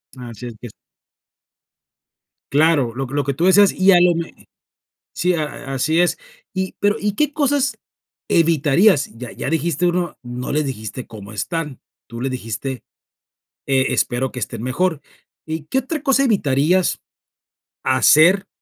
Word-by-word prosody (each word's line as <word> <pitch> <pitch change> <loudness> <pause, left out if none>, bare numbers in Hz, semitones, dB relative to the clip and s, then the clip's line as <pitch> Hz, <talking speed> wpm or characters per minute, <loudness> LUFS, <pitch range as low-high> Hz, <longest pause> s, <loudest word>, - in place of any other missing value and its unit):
Así 120 -2 -9
es, 120 - -7
que 120 - -8
es. 110 - -13 1.8
Claro, 145 -5 +3
lo 135 +1 -3
que 130 - -11
lo 145 0 +1
que 140 - -1
tú 165 +6 -1
decías, 195 +1 +6
y 190 +1 +4
a 180 - +6
lo 175 -1 +4
me 165 0 -7 0.7
sí, 180 +1 +1
a 155 -2 0 0.3
a - - -2
así 155 +6 +1
es. 175 - +1 0.3
Y, 190 -1 -3
pero, 205 0 +2
¿y 205 0 -1
qué 300 +5 0
cosas 285 -2 0 0.5
evitarías?, 165 +2 +3
ya 120 0 -8
ya - - -5
dijiste 165 +2 0
uno, 175 -1 -1
no 125 0 -5
les 150 0 0
dijiste: 120 -1 -6
"¿Cómo 105 -2 -11
están?", 150 +4 -4 0.3
tú 115 0 -9
les 135 +2 -2
dijiste: 130 +2 -5 0.8
"E 135 -1 +1
espero 130 +1 0
que 125 - -8
estén 115 -1 -5
mejor", 155 +5 -1 0.5
¿y 160 -1 -4
qué 160 +12 -1
otra 280 +4 -3
cosa 275 -2 +3
evitarías 180 - +2 0.8
hacer, 155 +9 +5
155 Hz, 160 wpm, -20 LUFS, 130-185 Hz, 1.8 s, decías